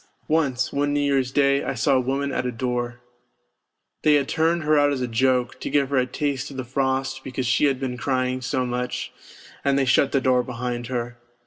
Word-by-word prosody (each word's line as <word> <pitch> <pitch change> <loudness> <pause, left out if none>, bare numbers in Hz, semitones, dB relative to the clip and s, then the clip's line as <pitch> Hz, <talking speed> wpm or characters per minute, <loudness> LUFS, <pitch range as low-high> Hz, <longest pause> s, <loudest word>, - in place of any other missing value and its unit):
Once, 145 -5 +1
one 145 +1 0
New - - +2
Year's 135 -3 +1
Day, 140 0 +3
I - - -3
saw 135 +4 +2
a 130 - +4
woman 135 +2 -1
at 125 - -1
a - - -1
door. 120 0 -3 1.0
They 150 -1 +5
had 140 -2 +2
turned 165 +1 +1
her 155 0 +3
out 145 -1 +4
as 135 -2 -2
a 125 - -1
joke, 125 +1 +1
to - - -4
give 140 -1 +1
her 140 - +2
a 125 0 +2
taste 140 -2 -2
of 140 - -9
the 130 - -3
frost 130 +1 -1
because 130 -1 -4
she 125 +4 +3
had 135 -3 +1
been 130 -2 -3
crying 130 -1 -1
so 130 0 -1
much, 125 0 -3 0.5
and 140 -1 +2
they 135 - +2
shut 130 +2 +3
the 140 - +2
door 130 -1 +3
behind 120 -1 -4
her. 120 -1 -4
130 Hz, 220 wpm, -23 LUFS, 125-140 Hz, 1.0 s, They